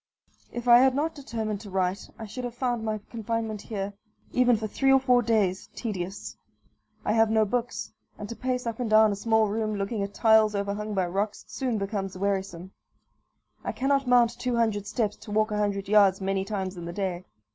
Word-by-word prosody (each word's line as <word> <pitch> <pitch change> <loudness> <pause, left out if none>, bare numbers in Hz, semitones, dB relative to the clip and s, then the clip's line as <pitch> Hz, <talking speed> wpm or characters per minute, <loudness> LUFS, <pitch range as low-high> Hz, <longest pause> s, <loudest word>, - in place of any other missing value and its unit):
If 240 0 -6
I 240 0 +9
had 260 0 +4
not 315 +3 0
determined 220 -7 -4
to 210 - -10
write 190 0 -1
I 225 - -7
should 220 +4 -7
have 245 -1 -5
found 245 -2 -1
my 215 -1 -1
confinement 225 -2 -3
here, 200 -2 -4 0.4
even 245 -2 +4
for 220 - -4
three 270 +5 +1
or 270 - +6
four 250 -2 +4
days, 210 -5 0
tedious. 195 -4 -5 0.7
I 210 - +2
have 225 0 +4
no 220 0 +3
books; 245 +3 -3 0.2
and 210 - -6
to 235 - -6
pace 250 0 -2
up 230 0 -3
and 240 -3 -1
down 215 0 +6
a - - -1
small 220 +1 +2
room, 215 +1 -1
looking 200 +2 -2
at 200 0 -4
tiles 220 -2 +4
overhung 200 +1 -2
by 190 -2 +2
rocks, 200 +4 -2
soon 250 -4 -2
becomes 195 -2 -3
wearisome. 190 -2 -2 0.9
I - - -3
cannot 270 +3 +1
mount 240 -1 +4
two 250 0 -1
hundred 215 -3 0
steps 215 -3 -1
to - - -13
walk 215 +1 +1
a 210 - -1
hundred 200 -2 -1
yards 200 -2 +5
many 195 0 -1
times 195 -2 -4
in 170 - -6
the 170 - -5
day. 185 -2 -3
215 Hz, 200 wpm, -27 LUFS, 200-235 Hz, 0.9 s, I